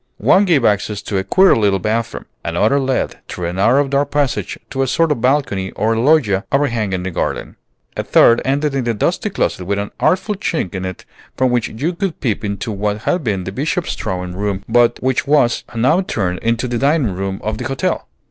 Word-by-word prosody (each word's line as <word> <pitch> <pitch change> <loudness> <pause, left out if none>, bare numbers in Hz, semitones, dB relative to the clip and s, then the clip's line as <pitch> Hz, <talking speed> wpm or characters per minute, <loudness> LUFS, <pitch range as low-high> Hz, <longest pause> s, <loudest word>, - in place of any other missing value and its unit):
One 200 +2 +4
gave 155 -10 +3
access 105 0 +1
to 100 - -1
a - - -2
queer 190 - +5
little 100 -3 +2
bathroom. 110 +4 -2 0.2
Another 105 +11 +1
led, 130 -1 -1
through 90 - -5
a 85 - -2
narrow 125 +9 +3
dark 140 +1 0
passage, 145 -3 -1
to 135 - -1
a 135 - +1
sort 165 +5 +2
of 140 - -1
balcony 125 -8 +1
or 110 +1 0
loggia 115 -6 +3
overhanging 115 -10 0
the 95 - -3
garden. - - -3 0.4
A - - -1
third 115 - +5
ended 145 +2 0
in 130 -3 -1
a 115 - 0
dusty - - 0
closet 90 - -2
with 100 +2 -1
an 100 0 -3
artful 190 +3 +1
chink 170 - -2
in 95 -1 -4
it 95 -2 -7 0.3
from 130 -1 +2
which 120 -2 +1
you 145 +11 -3
could 180 -1 -3
peep 115 -6 -1
into 100 +1 -3
what 105 +1 -2
had 180 -2 0
been 100 -6 -1
the 95 - -5
Bishop's 155 - -2
drawing 90 -3 -4
room 100 0 -2
but 120 +1 +3
which 130 0 0
was 140 -5 +3
now 130 +11 +3
turned 95 - -2
into 115 +2 0
the 120 -1 -2
dining 140 - +2
room 95 +1 -3
of 110 0 -3
the 125 - -4
hotel. 135 -1 -2
115 Hz, 205 wpm, -18 LUFS, 100-140 Hz, 0.4 s, queer